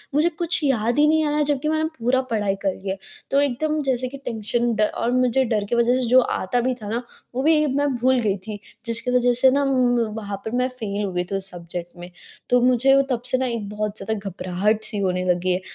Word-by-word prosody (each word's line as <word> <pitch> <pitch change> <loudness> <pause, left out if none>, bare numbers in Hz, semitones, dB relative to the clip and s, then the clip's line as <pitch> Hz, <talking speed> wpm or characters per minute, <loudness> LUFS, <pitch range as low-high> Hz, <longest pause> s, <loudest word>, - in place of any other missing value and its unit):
मुझे 310 +4 +4
कुछ 345 +1 +1
याद 240 -3 +1
ही 300 - +6
नहीं 315 0 +3
आया 295 0 +1
जबकि 290 +2 -1
मैंने 315 0 0
पूरा 250 +3 +2
पढ़ाई 205 -3 0
कर 190 - +2
लिया 190 0 -4
है। 195 - -10 0.3
तो 280 +1 +4
एकदम 300 +3 0
जैसे 255 -2 0
कि - - -7
टेंशन 235 +1 -1
ड 215 - 0
और 240 - 0
मुझे 255 +1 +2
डर 220 -3 0
की - - +3
वजह 235 +1 +3
से 255 -1 0
जो 255 +2 +6
आता 240 0 -1
भी 255 +1 0
था 205 - -6
ना, 235 +3 -2 0.3
वो 260 - -1
भी 305 -1 +4
मैं 285 0 +2
भूल 255 +1 +2
गई 205 -3 0
थी 210 -1 -5 0.3
जिसकी 230 +2 -3
वजह 245 0 +3
से 265 - +7
ना 280 +2 +2
उम, 250 -2 +2 0.2
वहाँ 205 -2 -4
पर 220 - -3
मैं 250 +1 +2
फ़ेल 210 -5 -4
हो 195 - -2
गई 180 0 0
थी - - 0
उस 195 0 -2
सब्जेक्ट 175 0 -7
में। 175 - -8 0.4
तो 245 - +5
मुझे 255 +2 +4
तब 245 -3 -1
से 255 +1 +1
ना 260 - 0
एक 230 -4 -3
बहुत 210 0 -3
ज़्यादा 220 - -3 0.2
घबराहट-सी 205 +5 -1
होने 185 -1 0
लगी 180 +1 +1
है। 185 - -2
240 Hz, 240 wpm, -22 LUFS, 205-260 Hz, 0.4 s, से